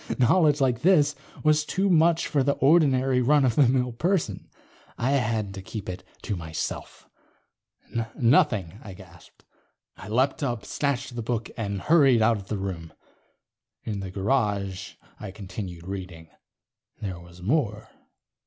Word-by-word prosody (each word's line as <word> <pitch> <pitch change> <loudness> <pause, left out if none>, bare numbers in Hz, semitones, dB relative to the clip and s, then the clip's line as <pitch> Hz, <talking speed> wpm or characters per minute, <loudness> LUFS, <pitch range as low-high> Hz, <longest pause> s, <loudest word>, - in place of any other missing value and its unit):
Knowledge 150 +3 +4
like 125 -3 +1
this 150 -4 +4 0.3
was 155 0 +4
too 190 +5 -1
much 170 -1 +3
for 145 - +1
the 140 +2 +2
ordinary 135 -4 +3
run 145 +2 +4
of 125 - +2
the 140 +1 +5
mill 125 -1 +1
person. 150 - -1 0.5
I 130 +3 0
had 115 -7 0
to 95 - -7
keep 100 +2 -7
it 90 - -6 0.2
to 105 - -2
myself. 80 -2 -6 1.1
"Nothing," 115 - +2
I 100 -5 -9
gasped. 85 -3 -17 0.5
I 95 - -10
leaped 130 +7 +1
up, 120 -6 -2
snatched 140 -3 -2
the 120 - -3
book, 115 0 -3
and 100 -4 -3
hurried 140 -8 +5
out 115 0 +3
of 100 -1 -10
the 105 - -3
room. 85 -5 -5 0.9
In 105 -3 -4
the 95 -1 -5
garage, 100 -2 -1 0.3
I - - -7
continued 95 -3 -8
reading. 90 -4 -7 0.7
There 95 -4 -5
was 85 +1 -14
more. 110 - -1
115 Hz, 145 wpm, -26 LUFS, 95-140 Hz, 1.1 s, the